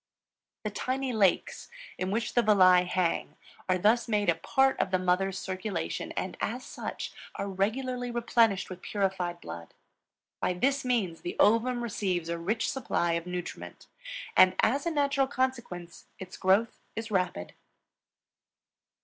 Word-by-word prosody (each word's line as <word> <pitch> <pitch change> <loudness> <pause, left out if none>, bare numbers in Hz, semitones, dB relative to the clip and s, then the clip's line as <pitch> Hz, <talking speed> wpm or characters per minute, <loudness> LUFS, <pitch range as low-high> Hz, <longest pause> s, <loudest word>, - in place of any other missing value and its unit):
The 215 - -2
tiny 255 +4 -2
lakes, 200 -5 +1 0.3
in 185 - -1
which 225 +3 -1
the 240 - +4
villi 185 -4 +6
hang, 180 -1 -1 0.3
are 185 - +3
thus 220 +5 +3
made 210 -4 +1
a - - +6
part 265 +11 +2
of - - +1
the 185 - +2
mother's 185 +1 +1
circulation 185 - -4
and - - -4
as - - -2
such - - -6 0.2
are 200 - -3
regularly 245 +6 -1
replenished 230 -4 +2
with 185 -1 -9
purified 190 -4 -2
blood. 85 - -9 0.6
By - - 0
this 270 +9 +1
means 220 -10 0
the 175 - -5
ovum 240 +3 +3
receives 185 -7 -2
a 170 0 -2
rich 215 +7 -1
supply 175 -9 0
of 170 +1 -2
nutriment, 180 -1 -6 0.5
and 185 0 +7
as 280 +8 +2
a - - +3
natural 280 -3 +1
consequence 240 -11 -3
its 185 -1 -9
growth 200 +4 +2 0.2
is 225 0 -5
rapid. 180 - -1
200 Hz, 145 wpm, -29 LUFS, 180-240 Hz, 0.6 s, and